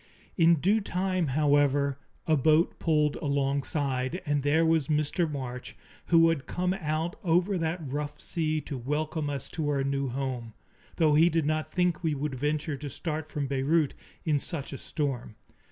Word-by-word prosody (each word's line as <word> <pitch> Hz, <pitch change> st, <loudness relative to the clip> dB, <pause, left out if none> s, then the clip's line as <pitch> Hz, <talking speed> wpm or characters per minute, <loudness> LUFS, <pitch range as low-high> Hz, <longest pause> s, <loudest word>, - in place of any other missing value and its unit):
In 170 Hz, -1 st, +5 dB
due 200 Hz, +8 st, +2 dB
time, 185 Hz, -2 st, -1 dB
however, 145 Hz, -2 st, +3 dB, 0.3 s
a 160 Hz, -, +3 dB
boat 155 Hz, +4 st, +3 dB
pulled 150 Hz, -2 st, +2 dB
alongside, 140 Hz, +1 st, -1 dB
and 145 Hz, -1 st, +1 dB
there 150 Hz, +4 st, +3 dB
was 160 Hz, -3 st, +2 dB
Mr. 150 Hz, +2 st, +1 dB
March, 125 Hz, -3 st, -6 dB, 0.3 s
who 165 Hz, -1 st, +6 dB
had 155 Hz, -5 st, -2 dB
come 180 Hz, +1 st, 0 dB
out 160 Hz, -2 st, -2 dB
over 180 Hz, +3 st, +2 dB
that 165 Hz, 0 st, -2 dB
rough 145 Hz, +2 st, -4 dB
sea 155 Hz, -2 st, -1 dB
to 140 Hz, -3 st, -6 dB
welcome 150 Hz, +3 st, -2 dB
us 140 Hz, -2 st, -4 dB
to 155 Hz, -3 st, -2 dB
our 140 Hz, -2 st, +1 dB
new 140 Hz, 0 st, -1 dB
home, 125 Hz, -3 st, -4 dB, 0.4 s
though 155 Hz, -3 st, +3 dB
he 160 Hz, +3 st, +6 dB
did 165 Hz, -3 st, +1 dB
not 155 Hz, +1 st, -1 dB
think 180 Hz, -2 st, +1 dB
we 155 Hz, -2 st, +1 dB
would 145 Hz, 0 st, -3 dB
venture 145 Hz, +3 st, -1 dB
to 145 Hz, +1 st, -6 dB
start 155 Hz, +2 st, -4 dB
from 145 Hz, -3 st, -2 dB
Beirut 140 Hz, +3 st, +1 dB, 0.3 s
in 150 Hz, -3 st, +2 dB
such 145 Hz, -2 st, -5 dB
a 135 Hz, -, -6 dB
storm. 130 Hz, -7 st, -3 dB
150 Hz, 170 wpm, -28 LUFS, 140-165 Hz, 0.4 s, who